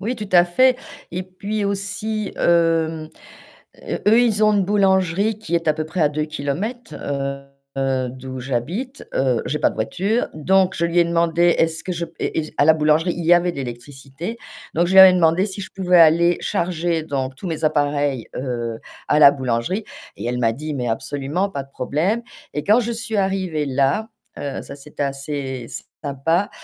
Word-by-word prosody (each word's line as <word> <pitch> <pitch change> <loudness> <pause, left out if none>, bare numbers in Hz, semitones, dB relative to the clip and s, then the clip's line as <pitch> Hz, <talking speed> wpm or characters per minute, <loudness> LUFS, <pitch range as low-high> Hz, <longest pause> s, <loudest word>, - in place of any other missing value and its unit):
Oui 230 +6 -2
tout 210 -4 -7
à 175 -1 +7
fait 255 +9 +3 0.3
et 180 +2 -3
puis 200 +3 -4
aussi, 200 +2 -3
hem, 165 -2 +2 1.0
eux 225 +3 +6
ils 215 -3 +2
ont 215 - +4
une 200 -2 +2
boulangerie 195 +1 +2
qui 190 -6 -4
est 165 - -3
à 155 - +3
peu 155 0 -3
près 165 +3 -4
à 150 - +4
2 150 +1 -2
kilomètres, 180 - -4 0.8
heu, 135 -1 0
d'où 130 +1 -8
j'habite, 160 - -4
heu, 130 -3 +1
j'ai 150 - -1
pas - - +3
de - - -10
voiture, 195 - -1
donc 190 +4 +2
je 170 - 0
lui 170 +1 +2
ai - - +4
demandé 170 0 +2
est-ce 165 0 +1
que 185 - -6
je 170 -1 -2 0.5
à - - +4
la 160 - +7
boulangerie 155 +3 +2
il 170 - -4
y 175 +2 +6
avait 175 +1 +2
de 170 - -11
l'électricité, 135 - -7 0.4
donc 170 +2 +2
je 180 - -2
lui 190 - +9
avais 190 -1 +10
demandé 175 +1 +3
si 200 -1 -6
je 190 - -7
pouvais 180 -2 +3
aller 170 +1 +5
charger 170 -1 -1
donc 135 -4 -3
tous 180 - -7
mes 160 -1 -3
appareils, 145 -4 0
heu, 120 -3 -3 0.3
à 150 - +3
la 140 -2 +8
boulangerie 130 - -2 0.3
et - - -7
elle 125 +1 -2
m'a 115 -2 +2
dit: 150 +6 -5
«Mais 125 -3 -3
absolument. 145 - -2
Pas 140 -6 -5
de 135 - -24
problème». 160 - -1 0.3
Et 150 - -2
quand 215 +3 +4
je 235 -1 -1
suis 225 -1 -4
arrivée 190 -6 -1
là, 140 +11 +1 0.3
heu, 140 -1 -4
ça 140 - -10
c'était 145 +1 -7
assez 140 -2 -4 0.4
sympa. 165 +7 0
165 Hz, 185 wpm, -21 LUFS, 140-190 Hz, 1.0 s, avais